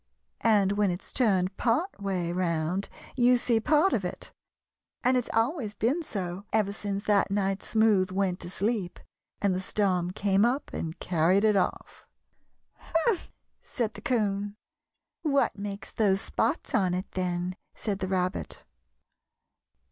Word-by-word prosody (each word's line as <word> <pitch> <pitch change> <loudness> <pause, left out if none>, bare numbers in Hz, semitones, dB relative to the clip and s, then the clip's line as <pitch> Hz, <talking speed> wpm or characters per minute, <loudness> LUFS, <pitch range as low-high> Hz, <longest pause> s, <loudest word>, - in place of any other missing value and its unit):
And 205 -3 +4
when 205 -1 +2
it's 180 +1 -5
turned 195 -6 +2
part 250 - 0
way 185 -4 -1
round 175 +1 -1 0.3
you 250 0 +5
see 235 -1 +2
part 300 - +3
of - - +1
it, - - -5 0.7
and 255 +1 +4
it's 250 -2 0
always 225 - 0
been 250 +11 +1
so 190 - -4
ever 210 -2 +2
since 200 -1 -4
that 205 -2 +3
night 195 0 0
Smoothe 215 -4 +3
went 185 -1 0
to - - -5
sleep 200 -1 -1 0.4
and 200 -2 +3
the 185 - -2
storm 185 -3 0
came 195 +2 +2
up 250 +5 0
and 160 0 -4
carried 180 +3 +2
it 215 -1 +4
off." 195 - -2 0.7
"Humph!" 345 +4 -1 0.3
said 230 -3 -3
the 205 - -10
'Coon. 205 -4 0 0.7
"What 280 -3 +2
makes 200 0 -6
those 195 -3 +2
spots - - -1
on 185 -3 +2
it, 185 +2 -4
then?" 180 0 -2 0.2
said 200 -3 -3
the 190 - -2
Rabbit. 185 -1 -2
200 Hz, 145 wpm, -28 LUFS, 185-225 Hz, 0.7 s, you